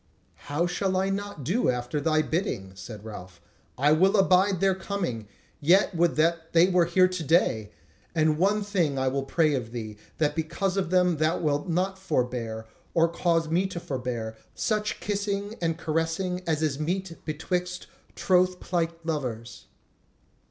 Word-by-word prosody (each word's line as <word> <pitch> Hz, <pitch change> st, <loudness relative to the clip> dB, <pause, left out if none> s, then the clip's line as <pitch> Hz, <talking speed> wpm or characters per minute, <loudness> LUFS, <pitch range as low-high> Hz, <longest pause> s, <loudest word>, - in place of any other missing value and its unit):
"How 150 Hz, +4 st, +1 dB
shall 190 Hz, +1 st, -1 dB
I 190 Hz, +1 st, +1 dB
not 200 Hz, -6 st, -4 dB
do 190 Hz, -, +1 dB
after 125 Hz, +3 st, -1 dB
thy 155 Hz, +1 st, +2 dB
bidding?" 155 Hz, -, -2 dB
said 105 Hz, +3 st, -10 dB
Ralph. 90 Hz, -5 st, -9 dB, 0.4 s
"I 145 Hz, +4 st, +3 dB
will 190 Hz, +7 st, +4 dB
abide 190 Hz, 0 st, +4 dB
their 195 Hz, 0 st, +3 dB
coming: 180 Hz, -, -4 dB, 0.3 s
yet 185 Hz, +7 st, +4 dB
would 170 Hz, 0 st, +2 dB
that 165 Hz, +1 st, +1 dB
they 170 Hz, +2 st, +6 dB
were 180 Hz, -2 st, +4 dB
here 185 Hz, +2 st, +4 dB
to 180 Hz, -2 st, -4 dB
day! 135 Hz, -, +2 dB, 0.5 s
And 155 Hz, -1 st, +2 dB
one 205 Hz, +3 st, +2 dB
thing 175 Hz, -9 st, 0 dB
I 130 Hz, 0 st, 0 dB
will 135 Hz, +1 st, -1 dB
pray 155 Hz, +3 st, +2 dB
of 120 Hz, -4 st, -3 dB
thee, 110 Hz, -3 st, -6 dB, 0.2 s
that 150 Hz, -2 st, +1 dB
because 170 Hz, +4 st, -1 dB
of 195 Hz, -4 st, 0 dB
them 180 Hz, -2 st, +3 dB
thou 155 Hz, +3 st, +1 dB
wilt 150 Hz, +2 st, -1 dB
not 190 Hz, +3 st, 0 dB
forbear, 125 Hz, -10 st, -2 dB, 0.3 s
or 165 Hz, 0 st, +4 dB
cause 165 Hz, -1 st, +1 dB
me 180 Hz, +4 st, +2 dB
to 180 Hz, -2 st, -5 dB
forbear, 125 Hz, -7 st, -4 dB, 0.2 s
such 215 Hz, -1 st, -1 dB
kissing 200 Hz, 0 st, -2 dB
and 165 Hz, -1 st, 0 dB
caressing 165 Hz, +3 st, -1 dB
as 160 Hz, -1 st, +1 dB
is 145 Hz, -2 st, 0 dB
meet 175 Hz, +2 st, -3 dB
betwixt 180 Hz, +3 st, -3 dB, 0.3 s
troth 185 Hz, 0 st, +2 dB
plight 170 Hz, -2 st, -2 dB
lovers." 125 Hz, -7 st, -4 dB
165 Hz, 160 wpm, -27 LUFS, 145-185 Hz, 0.5 s, they